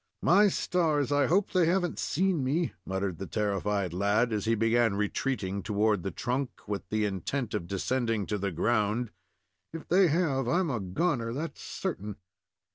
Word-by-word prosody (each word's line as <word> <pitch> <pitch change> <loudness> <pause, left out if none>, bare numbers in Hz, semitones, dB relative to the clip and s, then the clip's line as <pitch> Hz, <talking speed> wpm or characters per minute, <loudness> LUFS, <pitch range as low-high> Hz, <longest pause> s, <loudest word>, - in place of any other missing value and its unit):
"My 200 +4 +6
stars! 155 -7 +1
I 145 -1 +3
hope 190 +4 +2
they 180 -3 +3
have 180 +1 +2
n't - - -5
seen 180 -3 +1
me," 155 +6 0
muttered 95 -3 -2
the 95 - -5
terrified 100 0 -1
lad, 105 +5 +1
as 105 0 -1
he 115 +1 +2
began 115 -1 +2
retreating 105 -1 -1
toward 105 -1 +1
the 95 - -3
trunk, 125 +8 -3
with 100 -3 -4
the 110 0 +1
intent 105 - -3
of 90 -5 -3
descending 115 +2 -1
to 105 +1 -2
the 100 +1 -1
ground. 110 +5 0 0.6
"If 165 -1 -8
they 185 +1 +5
have, 145 -6 +1
I'm 170 +4 +1
a 120 - -1
goner, 115 - -1
that's 155 +5 -5
certain." 105 - -4
115 Hz, 170 wpm, -29 LUFS, 100-150 Hz, 0.6 s, My